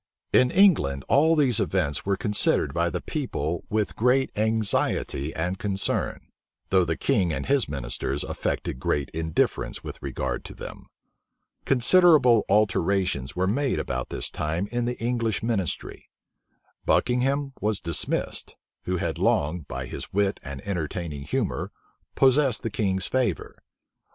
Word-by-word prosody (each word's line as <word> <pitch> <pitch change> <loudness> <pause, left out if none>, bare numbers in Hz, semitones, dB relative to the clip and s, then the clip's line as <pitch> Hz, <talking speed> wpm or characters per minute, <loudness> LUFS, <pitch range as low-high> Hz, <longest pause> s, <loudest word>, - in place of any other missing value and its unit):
In 125 - +5
England, 125 - +3
all 160 +4 +4
these 135 -8 +3
events 85 -4 -1
were 100 -1 +1
considered 105 +1 +1
by - - +1
the - - -4
people 80 +4 -3
with 105 -1 -1
great 125 +3 +2
anxiety 105 -9 0
and 90 +4 -2
concern; 100 -1 -1 0.5
though 95 -1 +5
the 80 -1 -2
king 100 -11 +1
and - - -3
his 140 - +2
ministers 70 +1 -3
affected 65 - -3
great 70 +1 -1
indifference 80 0 -1
with - - -8
regard - - -3
to - - -8
them. - - -9 0.8
Considerable 135 - +5
alterations 95 -8 +1
were 90 - 0
about 105 - -1
this - - -4
time 80 +4 -2
made - - -14
in 120 0 0
the 120 0 -2
English 115 -2 -1
ministry. 110 -7 -3 0.7
Buckingham 135 +3 +1
was 105 -1 0
dismissed, 85 -2 -2 0.3
who 90 0 -1
had - - -2
long, 75 +2 +1
by 65 +1 -5
his - - -7
wit 100 0 +1
and 70 -2 -7
entertaining 85 -4 -4
humor, - - -2 0.4
possessed 135 -2 +3
the 115 - -2
king's 95 -3 0
favor. 130 -2 -1
100 Hz, 135 wpm, -25 LUFS, 80-125 Hz, 0.8 s, In